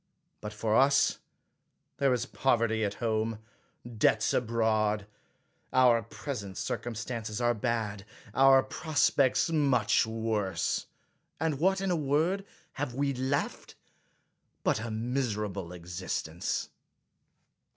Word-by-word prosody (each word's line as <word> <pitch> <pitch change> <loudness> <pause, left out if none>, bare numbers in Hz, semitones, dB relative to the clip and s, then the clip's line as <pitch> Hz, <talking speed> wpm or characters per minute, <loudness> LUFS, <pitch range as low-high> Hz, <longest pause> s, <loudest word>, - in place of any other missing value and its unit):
But 105 - -5
for 110 +1 -1
us 140 +2 +4 0.8
there 140 -2 +3
is 125 -1 0
pov 135 -1 +2
erty 110 -1 +1
at 100 -1 -1
home, 110 -1 -1 0.5
debts 110 -2 +2
abroad; 110 -3 +1 0.7
our 125 -3 +5
present 105 -4 -6
circum 120 -1 -3
stances 110 -1 -4
are 120 0 +2
bad, 110 -3 -2 0.3
our 135 +1 +6
prospects 145 -1 +2
much 130 -9 +3
worse; 110 -6 -1 0.5
and 155 -4 -1
what, 190 +3 +2
in 195 -1 0
a - - +2
word, 160 +6 +1 0.3
have 135 -4 -4
we 140 0 0
left, 130 +2 -2 0.9
but - - +2
a 115 +1 -4
miserable 110 -6 -2
existence 85 -1 -4
115 Hz, 110 wpm, -29 LUFS, 105-135 Hz, 0.9 s, our